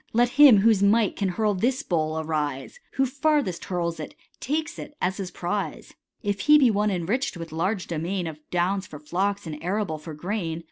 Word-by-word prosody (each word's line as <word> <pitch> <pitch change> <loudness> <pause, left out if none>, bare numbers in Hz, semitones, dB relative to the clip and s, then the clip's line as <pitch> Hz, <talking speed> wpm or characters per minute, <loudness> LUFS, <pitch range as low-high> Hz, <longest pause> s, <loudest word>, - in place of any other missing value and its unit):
Let 240 +2 +4
him 275 -3 +8
whose 215 -2 +4
might 210 +1 +3
can 195 -2 -1
hurl 210 +3 +1
this 245 +7 0
bowl, 160 -2 -1
arise; 155 - -3
Who 270 - +2
farthest 280 - 0
hurls 170 -2 -2
it, - - -7 0.2
takes 315 +3 -2
it 295 - -9
as 185 +1 -1
his 190 -2 -4
prize: 180 -1 -4 0.3
If 205 -1 -1
he 300 +9 +6
be 260 -5 +5
one 210 0 +1
enrich'd 195 +5 -1
with 165 -1 -7
large 185 +5 -1
domain 175 +3 -3
• - - -3
Of 150 - -16
downs 185 +2 0
for 150 - -9
flocks 185 +7 -2
and 155 -1 -7
arable 185 -3 -1
for 155 0 -8
grain. 170 -1 -3
190 Hz, 195 wpm, -25 LUFS, 165-225 Hz, 0.3 s, him